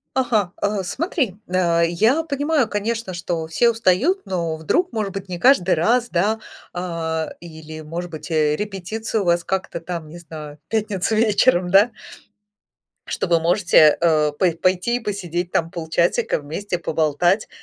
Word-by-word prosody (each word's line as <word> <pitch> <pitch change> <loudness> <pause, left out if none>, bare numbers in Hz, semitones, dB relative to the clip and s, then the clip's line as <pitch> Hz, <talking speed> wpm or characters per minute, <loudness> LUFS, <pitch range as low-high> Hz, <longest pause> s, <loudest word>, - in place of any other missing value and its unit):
Ага, 215 -8 +1
э, 205 -1 0
смотри, 250 - -2
э, 170 -2 +2
я 220 - +2
понимаю, 290 -4 0
конечно, 215 -2 -3
что 170 -2 -3
все 235 +9 +3
устают, 230 - +2
но 170 -4 -2
вдруг, 345 - 0
может 210 -3 -2
быть, 195 0 -6
не 175 -1 -5
каждый 190 -6 +4
раз, 235 +9 +2
да, 205 +6 +1 0.3
а, 165 -3 -3
или, 160 -2 -10
может 170 +3 -6
быть, 155 +1 -8
э, 150 -2 +2
репетиция 210 +3 -3
у - - -1
вас 175 0 +2
как-то 190 -2 -3
там, 165 -2 -6
не 175 - -10
знаю, 155 -3 -10
пятница 215 -1 -1
вечером, 210 -4 +3
да. 205 +5 +5 1.2
Что - - -2
вы 170 -1 +3
можете, 170 -3 +5
э, 155 -3 +3
пой 180 -3 +3
пойти 185 +8 +1
посидеть 180 -4 -3
там 165 0 0
полчасика 170 +1 0
вместе, 175 +6 -4
поболтать, 165 +5 +1
180 Hz, 150 wpm, -21 LUFS, 165-215 Hz, 1.2 s, да